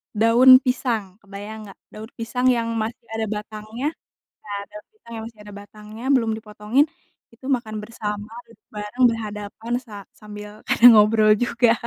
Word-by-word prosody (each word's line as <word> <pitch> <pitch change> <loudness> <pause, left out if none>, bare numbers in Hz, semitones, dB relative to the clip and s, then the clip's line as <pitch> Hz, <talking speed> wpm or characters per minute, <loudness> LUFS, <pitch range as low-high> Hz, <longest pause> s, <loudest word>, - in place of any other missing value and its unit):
daun 230 +4 +6
pisang 225 -6 -2
kebayang 205 +2 -9
nggak? 195 - -14
Daun 220 +2 -10
pisang 250 +3 -1
yang 235 -2 +2
masih 230 +2 -5
ada 225 0 -2
batangnya 215 +5 -6 0.5
iya, 205 - -11 0.2
daun 210 0 -11
pisang 235 - -16
yang 220 - -6
masih 225 -2 -13
ada 205 -1 -12
batangnya 215 +3 -12
belum 230 -4 +2
dipotongin, 215 +5 0 0.5
itu 260 +3 -13
makan 215 -3 -8
bersama, 210 -1 -6 0.2
duduk 225 -2 -23
bareng, 210 +5 -1
berhadapan 215 0 -6
sa 220 - -12 0.2
sambil 210 0 -10 0.2
ada 235 - +2
ngobrol 215 0 +5
juga. 235 -1 +3
220 Hz, 150 wpm, -22 LUFS, 210-235 Hz, 0.5 s, daun